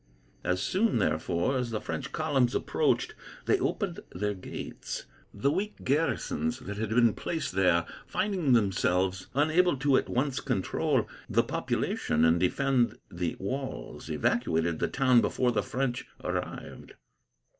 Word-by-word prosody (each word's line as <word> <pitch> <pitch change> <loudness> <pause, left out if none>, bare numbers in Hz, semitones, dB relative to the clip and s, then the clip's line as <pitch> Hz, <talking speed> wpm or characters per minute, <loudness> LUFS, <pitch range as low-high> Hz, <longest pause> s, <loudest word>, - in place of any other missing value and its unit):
As 90 0 0
soon, 205 - +2
therefore, 85 - +1
as 125 -1 -2
the 110 -2 -2
French - - -4
columns 140 -6 +1
approached, - - +1 0.3
they - - +3
opened - - -1
their 105 +3 -1
gates. 95 - -6 0.3
The 105 +8 +1
weak 200 +6 -3
garrisons 165 - 0
that 100 - -7
had 110 0 -2
been 115 -1 +4
placed 165 -2 -3
there, 90 -3 +3 0.2
finding 185 -9 +1
themselves 95 -3 +2
unable 155 +3 +3
to 135 0 +3
at - - -1
once 130 0 0
control - - 0 0.2
the - - +3
population 80 +1 0
and 80 +1 +4
defend 120 +4 +2
the 85 -1 -2
walls, 130 +7 -5
evacuated 80 0 +1
the - - +1
town 130 -3 +4
before 125 -1 +1
the 110 -3 +1
French 125 +2 -2 0.2
arrived. - - -5
120 Hz, 135 wpm, -29 LUFS, 95-140 Hz, 0.3 s, been